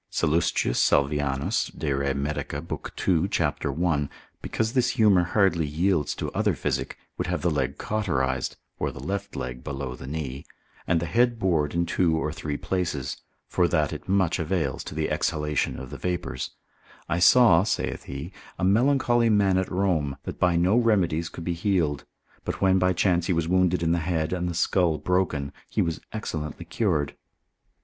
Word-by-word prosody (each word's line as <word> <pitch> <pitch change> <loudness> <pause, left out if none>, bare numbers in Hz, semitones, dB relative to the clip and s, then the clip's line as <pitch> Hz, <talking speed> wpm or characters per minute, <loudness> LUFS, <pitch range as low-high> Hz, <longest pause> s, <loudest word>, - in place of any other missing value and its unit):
Sallus. 85 +1 +1
Salvianus 70 +1 +1
de 75 -2 -1
re 70 0 0
medic. 70 +2 -3
lib. 75 +4 -5
2. 85 -4 +1
cap. - - -1
1. 80 -5 0 0.3
because 110 +1 -2
this 125 -2 +3
humour 105 -5 +5
hardly 85 -3 +2
yields 80 0 +1
to - - -4
other - - +1
physic, - - -2 0.2
would 90 - -1
have 90 0 -2
the 85 - +2
leg 70 -2 -1
cauterised, 65 -12 -1 0.2
or - - 0
the - - -10
left 100 +1 -4
leg, 60 0 -5
below 70 -2 -4
the 65 - -10
knee, 70 -2 -4 0.4
and 85 -1 +3
the 85 - -2
head 120 +6 +2
bored 85 -7 +1
in 85 0 +2
two 85 -1 +1
or 75 -1 -1
three 75 -2 -4
places, 90 -8 -2 0.3
for - - +2
that - - +1
it - - -8
much 95 -3 +2
avails 80 -5 -1
to - - -7
the 80 0 0
exhalation 75 -1 0
of 65 0 -8
the 70 - -7
vapours; 90 -7 -3 0.6
I 85 - 0
saw 90 -1 +7
(saith 100 - -2
he) 70 +7 -7 0.2
a - - -4
melancholy 120 +3 +3
man 100 -3 +3
at 95 - -2
Rome, 85 -7 0
that - - -6
by 90 -1 +3
no 90 +6 +3
remedies 90 -9 +2
could 85 - -8
be 85 - -1
healed, 85 -5 0 0.4
but - - -4
when 95 0 +4
by 90 0 +3
chance 90 -1 +2
he 90 - +2
was 80 -1 0
wounded 90 -1 +2
in 80 - +2
the 85 - +2
head, 80 -1 -1
and 90 -1 -1
the 85 - -4
skull 85 -2 +2
broken, 75 -4 0 0.2
he - - +1
was 85 -1 -3
excellently 80 -8 -5
cured. 80 -10 0
85 Hz, 180 wpm, -26 LUFS, 75-95 Hz, 0.6 s, saw